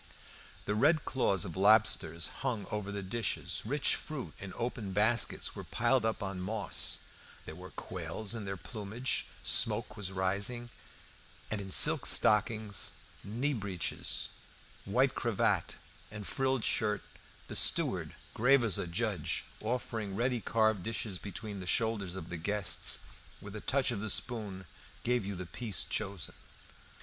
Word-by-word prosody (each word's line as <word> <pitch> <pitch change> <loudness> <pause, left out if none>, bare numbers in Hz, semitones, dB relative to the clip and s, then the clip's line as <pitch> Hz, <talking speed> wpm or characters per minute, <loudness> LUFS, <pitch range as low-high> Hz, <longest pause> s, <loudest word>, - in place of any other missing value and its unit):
The 105 - 0
red 150 +8 +3
claws 100 -8 +1
of 85 - -6
lobsters 95 -5 +4 0.2
hung 120 -7 -2
over 105 -1 -3
the 100 -1 -4
dishes; 110 +3 -2
rich 140 +5 +2
fruit 150 -5 -6
in 95 -1 -7
open 115 -5 -3
baskets 110 +4 +2
was - - -8
piled 120 +1 +2
up 110 -2 -1
on 95 -2 -4
moss; 100 0 0 0.4
there - - -7
were - - -10
quails 90 +4 -3
in 115 -2 -4
their 95 0 -4
plumage; 110 +6 -3 0.2
smoke - - +3
was 100 -3 -2
rising; 100 +6 0 0.8
and 110 -2 -1
in 95 - -7
silk - - +7
stockings, 105 0 +3 0.3
knee 125 +8 -1
breeches, 100 -7 -2 0.6
white - - +2
cravat, - - 0 0.3
and 105 -1 -8
frilled 135 -1 0
shirt, 105 -4 +1 0.4
the - - -6
steward, - - +5 0.2
grave 125 +3 +4
as 110 -6 +1
a - - -2
judge, 95 -2 -1 0.2
offering 110 -3 -3
ready 120 +2 0
carved 110 -1 +2
dishes 110 -2 -4
between 105 0 -7
the 90 - -7
shoulders 105 -3 +1
of 90 -3 -7
the 85 - -4
guests, 100 +4 +1 0.4
with 100 +1 -9
a 110 - -6
touch 135 -2 +1
of 115 - -3
the 110 +1 -4
spoon 105 -4 -1 0.4
gave 120 -4 0
you 100 - -3
the 90 0 -6
piece 105 +1 -1
chosen. 100 -5 -3
105 Hz, 145 wpm, -32 LUFS, 95-115 Hz, 0.8 s, silk